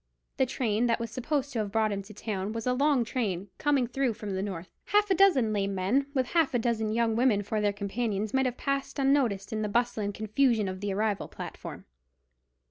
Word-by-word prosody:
The 265 Hz, -, +3 dB
train 235 Hz, -2 st, 0 dB
that 230 Hz, 0 st, +1 dB
was 230 Hz, -1 st, -4 dB
supposed 280 Hz, +3 st, -2 dB
to 235 Hz, -, -1 dB
have 205 Hz, -2 st, -2 dB
brought 220 Hz, 0 st, +2 dB
him 200 Hz, -1 st, -2 dB
to 200 Hz, +2 st, -13 dB
town 205 Hz, -1 st, -3 dB
was 230 Hz, -1 st, -4 dB
a 250 Hz, -, +2 dB
long 275 Hz, -1 st, +3 dB
train, 200 Hz, -6 st, -2 dB
coming 285 Hz, -4 st, +2 dB
through 250 Hz, -1 st, -1 dB
from 210 Hz, -2 st, -6 dB
the 190 Hz, 0 st, -1 dB
north. 185 Hz, -3 st, -5 dB
Half 415 Hz, -1 st, +2 dB
a -, -, +7 dB
dozen 325 Hz, -, +4 dB
lame 200 Hz, -1 st, 0 dB
men 220 Hz, +10 st, +1 dB
with 260 Hz, -1 st, +2 dB
half 325 Hz, -6 st, +2 dB
a -, -, +5 dB
dozen 225 Hz, -2 st, 0 dB
young 225 Hz, 0 st, +1 dB
women 230 Hz, -4 st, +3 dB
for 215 Hz, +2 st, -1 dB
their 205 Hz, -1 st, +2 dB
companions 205 Hz, +1 st, -2 dB
might 265 Hz, 0 st, +3 dB
have 250 Hz, -, -4 dB
passed 275 Hz, 0 st, -2 dB
unnoticed 260 Hz, -7 st, +1 dB
in 215 Hz, -, -1 dB
the 210 Hz, -, -1 dB
bustle 235 Hz, 0 st, +1 dB
and 205 Hz, -, -1 dB
confusion 215 Hz, +1 st, +1 dB
of 185 Hz, 0 st, -4 dB
the 205 Hz, -1 st, -1 dB
arrival 205 Hz, 0 st, 0 dB
platform. -, -, -8 dB
225 Hz, 220 wpm, -29 LUFS, 205-260 Hz, -, a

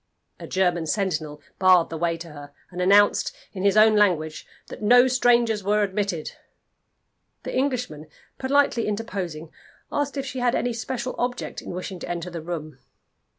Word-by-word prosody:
A -, -, -8 dB
German 175 Hz, -3 st, 0 dB
sentinel 155 Hz, -5 st, -2 dB, 0.2 s
barred 185 Hz, -3 st, +5 dB
the 165 Hz, -, -4 dB
way 170 Hz, 0 st, 0 dB
to 165 Hz, 0 st, -9 dB
her, 145 Hz, -1 st, -11 dB, 0.2 s
and 180 Hz, 0 st, -5 dB
announced, 205 Hz, +3 st, +4 dB, 0.2 s
in 185 Hz, -, -6 dB
his 200 Hz, +1 st, +3 dB
own 215 Hz, 0 st, +6 dB
language, 170 Hz, -7 st, +1 dB, 0.2 s
that -, -, -9 dB
no 245 Hz, +4 st, +6 dB
strangers 240 Hz, -4 st, +2 dB
were 210 Hz, +2 st, +2 dB
admitted. 195 Hz, -5 st, -2 dB, 1.1 s
The -, -, -5 dB
Englishman 250 Hz, -, -2 dB, 0.3 s
politely 265 Hz, -3 st, +2 dB
interposing, 190 Hz, -7 st, -4 dB, 0.4 s
asked 285 Hz, -1 st, -2 dB
if 275 Hz, -, -2 dB
she 260 Hz, -1 st, -5 dB
had 245 Hz, -1 st, +1 dB
any 245 Hz, -1 st, -1 dB
special 245 Hz, +2 st, -4 dB
object 245 Hz, 0 st, -3 dB
in -, -, -10 dB
wishing 180 Hz, +1 st, -6 dB
to -, -, -7 dB
enter 175 Hz, 0 st, -4 dB
the 170 Hz, -1 st, -6 dB
room. 155 Hz, -2 st, -6 dB
195 Hz, 160 wpm, -24 LUFS, 170-240 Hz, 1.1 s, own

